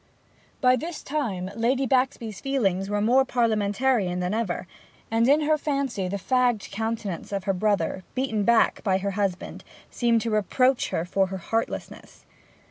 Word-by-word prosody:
By 255 0 +5
this 325 +5 -6
time 210 -11 -3
Lady 250 +4 +1
Baxby's 245 -5 0
feelings 195 -9 0
were 205 0 0
more 250 +5 +4
Parliamentarian 220 -4 +1
than 180 +2 -1
ever, 215 -5 -2 0.5
and 225 +1 +3
in 295 +2 +5
her 305 0 +2
fancy 275 -10 -1
the 200 +2 -2
fagged 245 0 +1
countenance 220 -4 -4
of 200 -1 -2
her 195 0 0
brother, 200 -1 0
beaten 255 -5 0
back 235 +1 +3
by 190 -3 +2
her 200 +1 -2
husband, 195 -2 -3 0.3
seemed 235 -2 +2
to 230 - -2
reproach 255 +5 +2
her 165 - -2
for 190 +2 +1
heartlessness. 190 +5 -4
225 Hz, 150 wpm, -25 LUFS, 195-255 Hz, 0.5 s, By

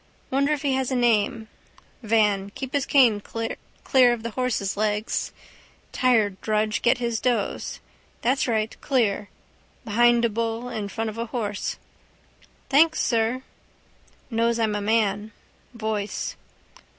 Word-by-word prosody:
Wonder 280 +2 +2
if 300 -1 -1
he 280 -2 +1
has 260 -1 0
a 260 - -1
name. 225 -2 +1 0.5
Van. 210 -3 +2
Keep 265 -1 -6
his 285 -2 0
cane 245 -7 +5
clear 240 +3 0
of 230 -2 -5
the 230 - -4
horse's 235 -5 -1
legs: 210 +1 -1 0.6
tired 220 -6 +2
drudge 215 0 0
get 240 - +3
his 235 -2 -1
doze. 240 -5 -1 0.4
That's 260 +4 +2
right. 220 -2 0
Clear. 220 -7 0 0.6
Behind 240 +2 +4
a - - +2
bull: 230 +2 -2
in 215 -4 -4
front 225 +2 -3
of 220 - -9
a 230 - -2
horse. 210 -3 -3 0.9
—Thanks, 310 +4 +4
sir. 230 +2 +1 0.9
Knows 230 +1 +1
I'm 220 -2 +1
a 205 - -2
man. 210 0 0 0.4
Voice. 215 -2 -3
230 Hz, 135 wpm, -24 LUFS, 215-245 Hz, 0.9 s, cane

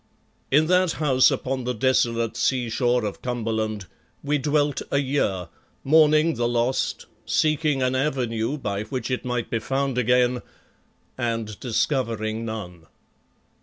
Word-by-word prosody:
In 150 +3 +4
that 180 0 +3
house 130 -4 +4
upon 130 0 -2
the 125 0 -2
desolate 115 -1 +1
sea 125 -3 0
shore 120 0 +1
of 105 - -5
Cumberland, 110 -4 -2 0.4
we 145 +1 0
dwelt 145 +1 +1
a - - +1
year, 130 -11 0 0.3
mourning 155 +2 +5
the 120 -1 0
lost, 120 +2 -1 0.2
seeking 155 -3 +1
an 130 0 +1
avenue 130 -2 -1
by 100 -7 -3
which 125 +1 -4
it 125 - -1
might 125 -2 -3
be 115 - 0
found 135 +1 -1
again 125 +1 +2 0.8
and 115 -3 -2
discovering 115 -3 -1
none. 90 -7 -7
125 Hz, 130 wpm, -24 LUFS, 115-140 Hz, 0.8 s, mourning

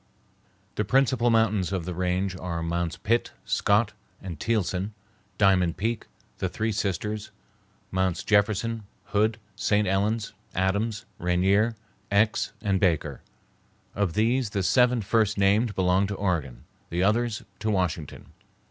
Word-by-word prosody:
The 105 - +2
principal 125 +1 +3
mountains 110 -5 +2
of 95 -4 -2
the 90 - -3
range 90 +2 -1
are 85 -3 -4
Mounts 85 -2 -2
Pitt, 115 - 0
Scott, 105 +1 +2 0.3
and 85 -6 -7
Thielson, 105 -2 -1 0.4
Diamond 95 -4 +3
Peak, 115 +2 -2 0.3
the - - -1
Three 110 +1 -1
Sisters, 105 +1 -2 0.6
Mounts 95 -2 0
Jefferson, 110 +2 +2 0.3
Hood, 110 +2 +2 0.2
St. 105 0 +1
Helen's, 105 +4 0 0.2
Adams, 100 +4 0
Rainier, 95 +6 +2 0.4
Aix, 105 +2 +2
and 100 -3 +1
Baker. 85 -6 0 0.7
Of 100 -4 0
these 115 +3 +2
the 100 -2 -1
seven 125 +2 +3
first 110 0 +2
named 100 +2 +3
belong 95 +1 +2
to 100 - -3
Oregon, 85 -11 -2 0.3
the 85 +2 0
others 110 +2 +1 0.2
to 110 - -1
Washington. 90 -7 -2
100 Hz, 130 wpm, -26 LUFS, 90-110 Hz, 0.7 s, principal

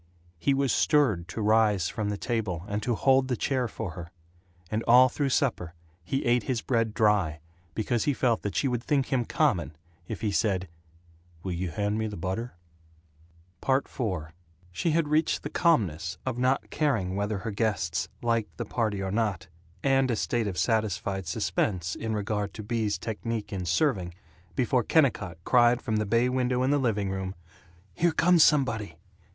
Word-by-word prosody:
He 140 +9 +2
was 135 -1 +1
stirred 120 - +2
to 110 +4 -4
rise 105 -4 +3
from 105 -1 -3
the 105 - -2
table 105 -9 -2
and 105 0 -2
to 120 +2 0
hold 135 +2 +3
the 125 -2 -1
chair 130 -3 0
for 110 -3 -5
her; 85 0 -8 0.6
and 110 +1 0
all 125 +2 +7
through 140 +2 -1
supper 120 - 0 0.3
he 135 +10 -2
ate 120 0 +3
his 120 +1 -2
bread 115 -3 0
dry 100 -8 +2 0.4
because 115 +1 0
he 145 - +2
felt 120 -3 +1
that 100 - -4
she 140 - +1
would 120 -2 -1
think 135 -1 0
him 125 -2 +1
common 95 - 0 0.3
if - - -5
he 110 -3 0
said 100 -3 0 0.8
"Will 95 - -3
you 90 +1 -2
hand 105 +5 -1
me 110 - -1
the 105 - -6
butter?" 95 +6 -4 1.1
IV 135 +1 +1 0.8
She 90 - -1
had 160 -1 +2
reached 155 +2 +1
the - - -5
calmness 95 - +1
of 130 -2 -1
not 130 +2 +1
caring 115 -12 0
whether 100 +1 -1
her 105 +4 -4
guests 100 -5 -1
liked 115 -2 -1
the 120 - -3
party 105 -3 -1
or 95 - -3
not, 105 -6 -1 0.3
and 135 -1 +3
a 120 - +1
state 115 0 -1
of 95 -3 -4
satisfied 100 -4 0
suspense 85 +2 -1
in 110 -1 -3
regard 105 -1 -2
to 110 - -6
Bea's 110 -1 -1
technique 110 -1 -4
in 95 -2 -3
serving, 90 - +1 0.4
before 125 0 +2
Kennicott 120 - +1
cried 120 -1 +4
from 110 -4 -2
the 110 -1 -1
bay 115 +4 +3
window 125 0 0
in 130 - +2
the 145 - +3
living 105 -6 0
room, 95 0 -4 0.6
"Here 170 - +1
comes 170 0 +5
somebody!" 130 -8 +2
110 Hz, 175 wpm, -27 LUFS, 100-130 Hz, 1.1 s, all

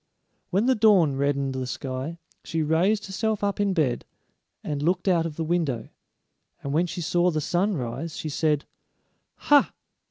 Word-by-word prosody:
When 195 +5 +1
the 260 - +4
dawn 200 - +4
reddened 140 -1 0
the 130 -1 -3
sky, 130 +5 -4 0.3
she 160 -1 -1
raised 180 +8 +2
herself 210 +2 -2
up 200 0 0
in 205 -1 +2
bed 145 -8 +1 0.6
and 145 -1 -3
looked 180 +5 0
out 170 -3 +3
of 155 - -8
the 165 - -2
window, 160 -7 -1 0.7
and 140 - -3
when 170 +4 +2
she 175 - -5
saw 175 +2 +2
the 155 -3 -1
sun 185 +6 0
rise 130 +6 -5
she - - -4
said: 150 0 0 0.7
"Ha! 290 -1 +4
165 Hz, 165 wpm, -25 LUFS, 145-190 Hz, 0.7 s, the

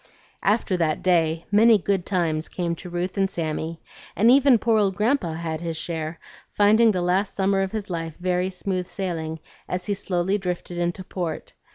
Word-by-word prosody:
After 205 -2 +1
that 160 -3 0
day 165 -3 +2
many 220 +2 +6
"good 195 -2 -1
times" 165 -4 0
came 175 -2 -2
to 180 - -9
Ruth 175 +3 -3
and 195 0 +2
Sammy; 165 -1 -3 0.4
and 225 +4 +5
even 270 -1 +6
poor 225 0 +2
old 195 -2 +1
Grandpa 210 - +1
had 160 -1 -4
his 165 -2 -3
share, 160 -1 -4 0.3
finding 215 +3 +5
the 185 -4 0
last 190 +3 0
summer 195 0 +2
of 190 0 -1
his 215 -2 -4
life 165 -4 -4
very 180 +1 0
smooth 185 -1 -3
sailing 165 -4 -4 0.3
as 180 0 -2
he 205 - 0
slowly 190 0 -1
drifted 180 -1 -4
into 175 +2 -2
port. 175 -3 -5
180 Hz, 180 wpm, -24 LUFS, 170-200 Hz, 0.4 s, many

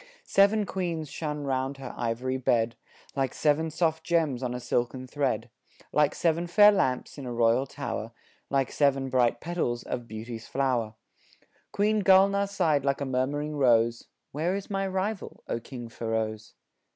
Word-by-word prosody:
Seven 205 +2 +4
queens 170 -6 -3
shone 150 -2 -4
round 135 0 -1
her 135 -2 -7
ivory 125 +3 -2
bed, 120 -2 +1 0.4
Like 135 -2 -1
seven 155 +2 +2
soft 160 0 0
gems 160 -8 +1
on 125 -1 -2
a - - -3
silken 125 +1 -1
thread, 125 -4 -2 0.4
Like 150 -1 +2
seven 170 +1 +1
fair 205 +4 +7
lamps 140 -8 -1
in 135 - -6
a - - -4
royal 120 +3 +2
tower, - - -5 0.4
Like 135 -2 +1
seven 135 -2 +1
bright 120 -2 +2
petals 160 -9 -2
of 120 -2 -5
Beauty's 115 +1 -7
flower 125 -5 0 0.8
Queen 210 +1 +2
Gulnaar 200 +1 +5
sighed 165 -8 +1
like 140 -1 0
a 140 - -2
murmuring 140 +4 -1
rose 120 -3 +3 0.2
"Where 165 +6 -1
is 200 +1 -6
my 195 0 0
rival, 190 +2 -3
O - - -2
King 120 0 -8
Feroz?" 110 -1 -3
135 Hz, 155 wpm, -28 LUFS, 120-170 Hz, 0.8 s, fair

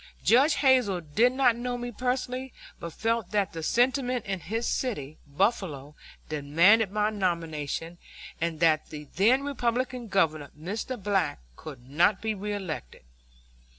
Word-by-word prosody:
Judge 270 +7 +5
Hazel 255 -10 +3
did 215 +11 +2
not 260 -3 +3
know 245 +1 -3
me 245 0 -5
personally, 255 +2 -3 0.3
but 170 - -6
felt 225 +2 -1
that 205 -2 0
the 165 - -5
sentiment 245 - +1
in 195 -1 -3
his 225 +7 -3
city, 155 - -3
Buffalo, 150 - -1 0.3
demanded 170 +9 +3
my 210 +1 +1
nomination, 170 -4 -3 0.4
and 165 -1 -1
that 160 -2 +3
the 150 -1 -7
then 245 +8 +4
Republican 250 -2 -2
Governor, 155 -8 +1
Mr. 215 +9 -4
Black, 195 -7 0 0.2
could 130 - -11
not 170 +9 +3
be 220 0 -2
reelected. 195 - -5
205 Hz, 135 wpm, -27 LUFS, 165-245 Hz, 0.4 s, Judge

